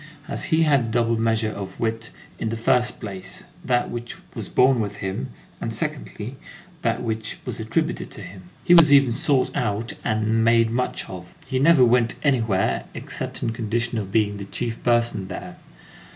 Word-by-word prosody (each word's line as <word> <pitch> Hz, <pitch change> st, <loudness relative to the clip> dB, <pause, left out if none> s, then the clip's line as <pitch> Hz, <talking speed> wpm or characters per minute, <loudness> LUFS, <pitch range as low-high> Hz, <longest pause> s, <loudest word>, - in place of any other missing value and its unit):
As -, -, -2 dB
he 160 Hz, 0 st, +3 dB
had 145 Hz, -3 st, +4 dB
a -, -, -2 dB
double 115 Hz, 0 st, +1 dB
measure 115 Hz, -1 st, +1 dB
of 95 Hz, -2 st, -7 dB
wit, 115 Hz, 0 st, -2 dB, 0.3 s
in 110 Hz, -, -1 dB
the 115 Hz, -, -3 dB
first 120 Hz, +2 st, +1 dB
place, 100 Hz, -4 st, -3 dB, 0.2 s
that 120 Hz, -1 st, +1 dB
which 120 Hz, 0 st, -5 dB, 0.2 s
was -, -, -4 dB
born 130 Hz, -1 st, +4 dB
with 105 Hz, -2 st, -2 dB
him, 95 Hz, -9 st, -4 dB, 0.3 s
and -, -, -2 dB
secondly, 120 Hz, +6 st, -3 dB, 0.4 s
that 115 Hz, +1 st, 0 dB
which 110 Hz, -2 st, -3 dB
was -, -, -4 dB
attributed -, -, -1 dB
to -, -, -9 dB
him, 90 Hz, -1 st, -11 dB
he 175 Hz, -, +5 dB
was 165 Hz, -4 st, +8 dB
even 140 Hz, -3 st, +6 dB
sought 130 Hz, +3 st, +1 dB
out 110 Hz, 0 st, -1 dB
and 110 Hz, 0 st, +1 dB
made 115 Hz, 0 st, +4 dB
much 125 Hz, +2 st, -1 dB
of. 90 Hz, -1 st, -9 dB
He 130 Hz, -1 st, -1 dB
never 145 Hz, -2 st, +6 dB
went 120 Hz, -1 st, +3 dB
anywhere 115 Hz, -9 st, +1 dB
except -, -, -4 dB
on 115 Hz, -, 0 dB
condition 115 Hz, +1 st, -1 dB
of 100 Hz, -2 st, -5 dB
being 105 Hz, -1 st, +1 dB
the 100 Hz, -, -6 dB
chief 115 Hz, +3 st, -4 dB
person 120 Hz, -5 st, +2 dB
there. -, -, -7 dB
115 Hz, 180 wpm, -23 LUFS, 110-125 Hz, 0.4 s, was